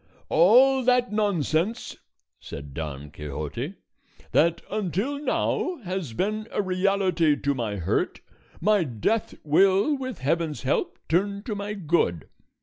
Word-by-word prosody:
"All 255 Hz, +10 st, +5 dB
that 250 Hz, -2 st, +3 dB
nonsense," 200 Hz, -1 st, 0 dB, 0.4 s
said 70 Hz, -1 st, -9 dB
Don 75 Hz, -1 st, -6 dB
Quixote, 75 Hz, 0 st, -5 dB, 0.6 s
"that 170 Hz, +1 st, +3 dB
until 210 Hz, -, -1 dB
now 355 Hz, +4 st, 0 dB
has 180 Hz, -, -4 dB
been 215 Hz, -, -2 dB
a -, -, -2 dB
reality 185 Hz, -4 st, +2 dB
to 140 Hz, -, 0 dB
my 115 Hz, -6 st, -3 dB
hurt, 90 Hz, -5 st, -1 dB, 0.4 s
my 205 Hz, +1 st, +3 dB
death 155 Hz, -, -1 dB
will 195 Hz, -, +4 dB
with 260 Hz, -5 st, -5 dB
heaven's 155 Hz, +2 st, -1 dB
help 135 Hz, -, 0 dB
turn 200 Hz, +4 st, 0 dB
to 220 Hz, -, -4 dB
my 205 Hz, +1 st, -4 dB
good. 160 Hz, -, 0 dB
185 Hz, 125 wpm, -25 LUFS, 145-210 Hz, 0.6 s, All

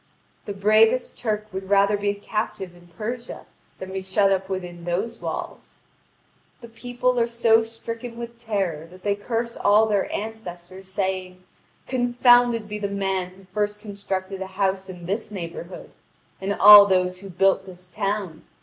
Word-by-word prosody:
The 205 Hz, -, -4 dB
bravest 215 Hz, +5 st, +3 dB
Turk 215 Hz, -3 st, -2 dB
would 190 Hz, 0 st, -6 dB
rather 200 Hz, +1 st, +4 dB
be 205 Hz, 0 st, -1 dB
a 200 Hz, -, -1 dB
captive 200 Hz, -3 st, -4 dB
in 175 Hz, 0 st, -18 dB
Persia 235 Hz, +7 st, -6 dB, 0.3 s
than 190 Hz, 0 st, -8 dB
be 190 Hz, -, -3 dB
shut 195 Hz, +1 st, +2 dB
up 190 Hz, 0 st, 0 dB
within 180 Hz, -2 st, -5 dB
those 195 Hz, +7 st, -3 dB
walls. -, -, -6 dB, 0.8 s
The 235 Hz, -, -11 dB
people 245 Hz, +2 st, -1 dB
are 230 Hz, -, +2 dB
so 235 Hz, -1 st, +3 dB
stricken 230 Hz, +1 st, -7 dB
with 235 Hz, 0 st, -8 dB
terror 195 Hz, -9 st, -2 dB
that 185 Hz, +2 st, -16 dB
they 205 Hz, -, +1 dB
curse 230 Hz, +3 st, -3 dB
all 210 Hz, +2 st, +4 dB
their 205 Hz, -3 st, 0 dB
ancestors, 190 Hz, -3 st, -7 dB
saying: 185 Hz, -1 st, -3 dB, 0.4 s
"Confounded 245 Hz, -2 st, +3 dB
be 210 Hz, 0 st, -5 dB
the 205 Hz, -, -2 dB
man 195 Hz, -2 st, -2 dB
who 195 Hz, -, -17 dB
first 210 Hz, 0 st, -1 dB
constructed 195 Hz, -2 st, -5 dB
a 190 Hz, -, -4 dB
house 190 Hz, 0 st, -1 dB
in 180 Hz, -2 st, -9 dB
this 200 Hz, +6 st, -2 dB
neighbourhood, 175 Hz, -2 st, -8 dB, 0.5 s
and 200 Hz, +1 st, -1 dB
all 205 Hz, 0 st, +10 dB
those 180 Hz, -1 st, +1 dB
who 195 Hz, 0 st, -10 dB
built 195 Hz, +1 st, +2 dB
this 180 Hz, -1 st, -12 dB
town! 200 Hz, -4 st, -3 dB
200 Hz, 160 wpm, -24 LUFS, 190-225 Hz, 0.8 s, all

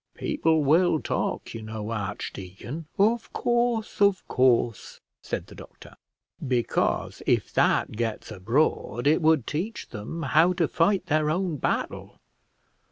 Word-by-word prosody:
"People 160 Hz, -1 st, +1 dB
will 160 Hz, +3 st, +4 dB
talk, -, -, -3 dB
you 115 Hz, -, -6 dB
know, 110 Hz, 0 st, -6 dB
archdeacon." 105 Hz, -, -6 dB
"Of 220 Hz, +3 st, +2 dB
course, 240 Hz, -3 st, 0 dB
of 200 Hz, -2 st, +3 dB
course," 120 Hz, -3 st, +1 dB, 0.2 s
said -, -, -4 dB
the -, -, -14 dB
doctor. -, -, -13 dB, 0.5 s
"Because, 125 Hz, -2 st, 0 dB
if -, -, +1 dB
that -, -, +2 dB
gets 110 Hz, 0 st, -3 dB
abroad, 115 Hz, +3 st, 0 dB
it 155 Hz, +4 st, +4 dB
would 155 Hz, -6 st, +3 dB
teach 190 Hz, +9 st, -4 dB
them 120 Hz, +10 st, -6 dB
how 160 Hz, +6 st, +4 dB
to 175 Hz, -3 st, +1 dB
fight 185 Hz, +5 st, +1 dB
their 155 Hz, 0 st, +1 dB
own 175 Hz, -1 st, -1 dB
battle." -, -, -3 dB
155 Hz, 130 wpm, -26 LUFS, 115-180 Hz, 0.5 s, will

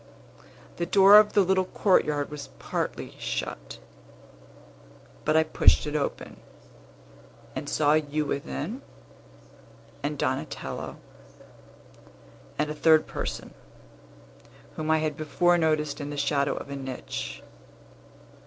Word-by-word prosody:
The 170 Hz, -, -2 dB
door 195 Hz, +2 st, +8 dB
of 210 Hz, 0 st, +2 dB
the 200 Hz, -, +5 dB
little 190 Hz, 0 st, +2 dB
courtyard 150 Hz, -7 st, +1 dB
was 150 Hz, -1 st, -7 dB
partly -, -, -4 dB
shut; -, -, -4 dB, 1.5 s
but 155 Hz, +1 st, +3 dB
I 160 Hz, -, +5 dB
pushed 155 Hz, -, +4 dB
it 150 Hz, 0 st, -4 dB
open, 145 Hz, -, -3 dB, 1.2 s
and -, -, -4 dB
saw 150 Hz, -1 st, +3 dB
you 155 Hz, 0 st, 0 dB
within, 70 Hz, -, -4 dB, 1.2 s
and 145 Hz, +1 st, -3 dB
Donatello, 135 Hz, +4 st, -3 dB, 1.6 s
and 150 Hz, 0 st, 0 dB
a -, -, -2 dB
third 155 Hz, 0 st, +4 dB
person, -, -, -5 dB, 1.2 s
whom 155 Hz, 0 st, -4 dB
I 160 Hz, -, +4 dB
had 155 Hz, -1 st, -1 dB
before 175 Hz, +4 st, +2 dB
noticed 155 Hz, -2 st, 0 dB
in 145 Hz, -, -5 dB
the 145 Hz, -, -6 dB
shadow 140 Hz, 0 st, +1 dB
of 140 Hz, -, -7 dB
a -, -, -4 dB
niche. 130 Hz, -, -6 dB
150 Hz, 115 wpm, -26 LUFS, 140-160 Hz, 1.6 s, door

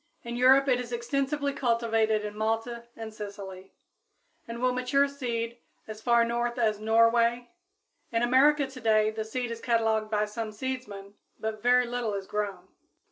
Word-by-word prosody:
In 235 Hz, 0 st, -5 dB
Europe 265 Hz, +3 st, +5 dB
it 250 Hz, -2 st, +3 dB
is 245 Hz, -1 st, -6 dB
extensively 275 Hz, +4 st, -1 dB
cultivated 225 Hz, -4 st, +1 dB
in 210 Hz, 0 st, -6 dB
Malta 225 Hz, +2 st, -2 dB
and 220 Hz, -1 st, -8 dB
Sicily, 200 Hz, -3 st, -8 dB, 0.8 s
and 230 Hz, 0 st, -6 dB
will 255 Hz, +1 st, +2 dB
mature 255 Hz, +3 st, +2 dB
seed 235 Hz, -4 st, -4 dB, 0.3 s
as 215 Hz, 0 st, -8 dB
far 235 Hz, 0 st, +4 dB
north 240 Hz, +1 st, -2 dB
as 215 Hz, -3 st, +1 dB
Norway; 230 Hz, +3 st, +3 dB, 0.6 s
in 230 Hz, 0 st, +1 dB
America, 280 Hz, +4 st, +4 dB
today, 220 Hz, -5 st, +1 dB
the 220 Hz, 0 st, -4 dB
seed 240 Hz, +2 st, -4 dB
is 230 Hz, 0 st, -6 dB
cataloged 225 Hz, -2 st, +1 dB
by 210 Hz, -1 st, +1 dB
some 215 Hz, +1 st, -5 dB
seedsmen, 210 Hz, -4 st, -6 dB, 0.3 s
but 220 Hz, -1 st, -4 dB
very 250 Hz, +1 st, +4 dB
little 240 Hz, -3 st, -2 dB
is 195 Hz, -1 st, -4 dB
grown. 195 Hz, -3 st, -4 dB
230 Hz, 155 wpm, -28 LUFS, 215-250 Hz, 0.8 s, Europe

